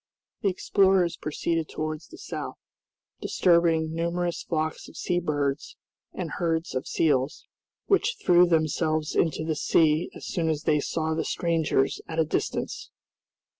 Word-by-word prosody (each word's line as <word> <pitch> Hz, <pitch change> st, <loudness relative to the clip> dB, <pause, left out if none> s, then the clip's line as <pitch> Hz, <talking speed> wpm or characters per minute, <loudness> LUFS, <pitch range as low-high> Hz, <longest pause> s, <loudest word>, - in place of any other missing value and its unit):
The 200 Hz, -, +2 dB
explorers 190 Hz, -1 st, +2 dB
proceeded 160 Hz, +1 st, -2 dB
towards 155 Hz, 0 st, -4 dB
the -, -, -13 dB
south, -, -, -6 dB, 0.6 s
disturbing 165 Hz, -2 st, +2 dB
numerous 170 Hz, +1 st, -1 dB
flocks 155 Hz, -1 st, -3 dB
of -, -, -14 dB
sea 175 Hz, 0 st, 0 dB
birds 145 Hz, -4 st, -2 dB, 0.3 s
and 175 Hz, -4 st, -5 dB
herds 165 Hz, -1 st, -1 dB
of 130 Hz, 0 st, -3 dB
seals, 140 Hz, -3 st, +1 dB, 0.4 s
which 420 Hz, +4 st, +2 dB
threw 180 Hz, -, +5 dB
themselves 155 Hz, -1 st, +1 dB
into 155 Hz, -1 st, +1 dB
the 160 Hz, -1 st, -1 dB
sea 155 Hz, +2 st, +2 dB
as -, -, -9 dB
soon 165 Hz, -4 st, -1 dB
as 155 Hz, -1 st, -1 dB
they 150 Hz, -1 st, +3 dB
saw 160 Hz, +2 st, -1 dB
the 160 Hz, -, -1 dB
strangers 165 Hz, -5 st, 0 dB
at 160 Hz, -, -6 dB
a 160 Hz, -, +3 dB
distance. -, -, -3 dB
160 Hz, 140 wpm, -26 LUFS, 155-175 Hz, 0.6 s, threw